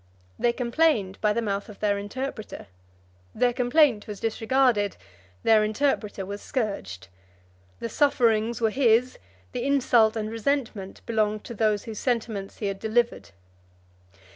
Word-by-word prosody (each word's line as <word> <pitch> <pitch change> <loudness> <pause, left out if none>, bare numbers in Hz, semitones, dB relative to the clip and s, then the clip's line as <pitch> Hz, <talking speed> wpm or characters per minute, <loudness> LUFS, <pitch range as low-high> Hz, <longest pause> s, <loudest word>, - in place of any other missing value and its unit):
They 240 - +3
complained 235 -5 +1
by 210 - +3
the 230 +2 -1
mouth 200 -1 -2
of 210 - -12
their 205 -1 +1
interpreter: 220 +2 -6 0.7
their 245 +1 +2
complaint 245 -2 +3
was 205 -2 -6
disregarded; 225 -2 +1 0.5
their 220 -1 +5
interpreter 215 -3 -1
was 200 +2 -6
scourged; 200 - -4 0.7
the - - -3
sufferings 230 -3 +2
were 225 -1 +2
his; 245 0 +2 0.3
the - - -3
insult 245 -5 +3
and 215 -1 -3
resentment 225 -4 -2
belonged 215 -2 0
to 235 - -8
those 215 -2 +1
whose 220 -2 -7
sentiments 225 -5 -2
he 210 - -4
had 195 -1 -2
delivered. 235 - 0
225 Hz, 135 wpm, -26 LUFS, 210-245 Hz, 0.7 s, their